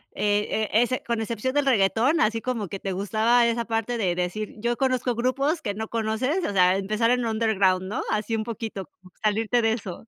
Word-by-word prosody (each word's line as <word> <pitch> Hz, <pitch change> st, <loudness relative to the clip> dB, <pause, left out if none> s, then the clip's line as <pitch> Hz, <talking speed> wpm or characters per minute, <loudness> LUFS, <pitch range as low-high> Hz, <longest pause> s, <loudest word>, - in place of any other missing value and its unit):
eh 205 Hz, 0 st, +1 dB
eh, 220 Hz, -1 st, -1 dB
ese 255 Hz, +1 st, -1 dB
con 235 Hz, -1 st, -2 dB
excepción 230 Hz, +3 st, -2 dB
del 290 Hz, 0 st, +1 dB
reguetón, 235 Hz, +6 st, +3 dB
así 225 Hz, +1 st, +1 dB
como 230 Hz, -5 st, -2 dB
que 195 Hz, -, -5 dB
te 195 Hz, -, -4 dB
gustaba 220 Hz, +5 st, +2 dB
esa 235 Hz, 0 st, 0 dB
parte 225 Hz, +1 st, -2 dB
de 180 Hz, -5 st, 0 dB
decir: 180 Hz, +4 st, -3 dB
"Yo 235 Hz, +2 st, -1 dB
conozco 255 Hz, -2 st, 0 dB
grupos 275 Hz, +7 st, 0 dB
que 205 Hz, -3 st, -3 dB
no 220 Hz, +1 st, -4 dB
conoces". 230 Hz, +10 st, -1 dB
O -, -, -1 dB
sea 185 Hz, 0 st, +4 dB
empezar 215 Hz, +4 st, +1 dB
en 250 Hz, 0 st, +1 dB
underground, 215 Hz, -5 st, +1 dB
¿no?, 200 Hz, +3 st, -3 dB
así 215 Hz, +1 st, -1 dB
un 220 Hz, -, -1 dB
poquito 220 Hz, -3 st, -5 dB
como 185 Hz, +1 st, -22 dB
salirte 220 Hz, +3 st, +1 dB
de 225 Hz, -1 st, +2 dB
eso. 205 Hz, -2 st, -7 dB
225 Hz, 210 wpm, -25 LUFS, 205-240 Hz, -, sea